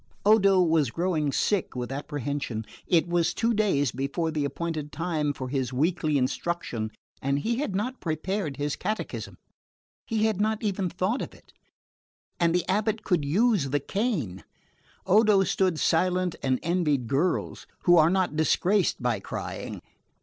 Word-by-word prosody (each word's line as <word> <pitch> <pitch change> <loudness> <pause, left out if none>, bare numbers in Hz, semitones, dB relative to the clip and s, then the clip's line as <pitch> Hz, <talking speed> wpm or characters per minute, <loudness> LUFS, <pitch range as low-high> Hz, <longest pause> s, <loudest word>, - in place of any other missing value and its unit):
Odo 200 -3 +5
was 160 -6 +2
growing 160 -1 0
sick 195 +5 0
with 125 0 -4
apprehension. 140 -5 -3 0.2
It 170 -2 +3
was 170 -1 +1
two 230 +1 +1
days 190 - +2
before 140 +6 -2
the 150 -2 -1
appointed 155 0 -4
time 155 -2 -1
for 130 -2 -5
his 130 -1 -2
weekly 155 +2 +1
instruction 130 -4 -2 0.3
and 140 +1 +1
he 230 +11 -1
had 255 -9 -2
not 250 +6 -2
prepared 165 -1 -2
his 145 0 -1
catechism. 215 +3 -4 0.7
He 220 -2 +1
had 215 -3 +1
not 220 +1 0
even 195 -3 0
thought 185 +8 -1
of - - -6
it - - -21 0.9
and 170 -1 +3
the 180 - +1
abate 215 +2 0
could 175 -6 +1
use 190 - +2
the 145 +2 +1
cane. 155 - -2 0.6
Odo 205 0 +5
stood 185 -4 +1
silent 180 +2 +1
and 130 -1 +1
envied 155 -7 +1
girls, 145 +10 -1 0.2
who 175 - +6
are 160 -1 +6
not 185 -3 +1
disgraced 175 +1 +2
by 120 -4 +1
crying. - - -6
170 Hz, 150 wpm, -27 LUFS, 145-195 Hz, 0.9 s, who